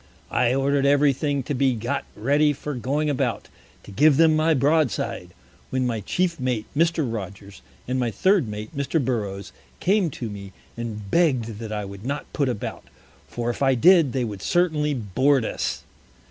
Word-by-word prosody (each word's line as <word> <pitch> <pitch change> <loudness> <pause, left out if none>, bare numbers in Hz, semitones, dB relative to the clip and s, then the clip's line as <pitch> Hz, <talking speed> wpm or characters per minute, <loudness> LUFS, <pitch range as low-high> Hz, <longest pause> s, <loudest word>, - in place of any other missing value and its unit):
I 125 +1 +2
order'd 140 +1 +1
everything 145 0 +2
to 145 - -3
be 130 -1 +2
got 115 +2 -3
ready 145 +6 +2
for 150 +2 -6
going 140 +5 -1
about, 130 -6 -1 0.3
to - - -12
give 145 +7 +4
them 160 -1 +5
my 155 +1 +3
Broad 150 +1 +3
side, 100 - -4 0.4
when 130 -1 0
my 115 -3 -1
Chief 170 - -1
Mate 125 -4 -1
Mr. 165 0 +2
Rogers, 100 -1 -8 0.3
and 130 +1 -1
my 120 -2 0
Third 185 - +2
Mate 105 +1 -7
Mr. 140 +3 0
Burroughs 105 -7 -3 0.3
came 190 -1 +2
to 125 -4 -6
me, 100 -2 -8 0.2
and 110 -4 -6
begg'd 125 -11 +1
that 110 -2 -6
I 105 -1 -3
would 100 0 -10
not 140 +4 -5
put 140 -3 0
about, 115 -5 -5 0.4
for 120 0 -2
if 120 - -9
I 135 -1 +4
did, 165 +1 +5
they 130 -1 -1
would 105 -5 -5
certainly 155 - +1
board 125 +4 +1
us. - - -3
130 Hz, 175 wpm, -24 LUFS, 110-150 Hz, 0.4 s, them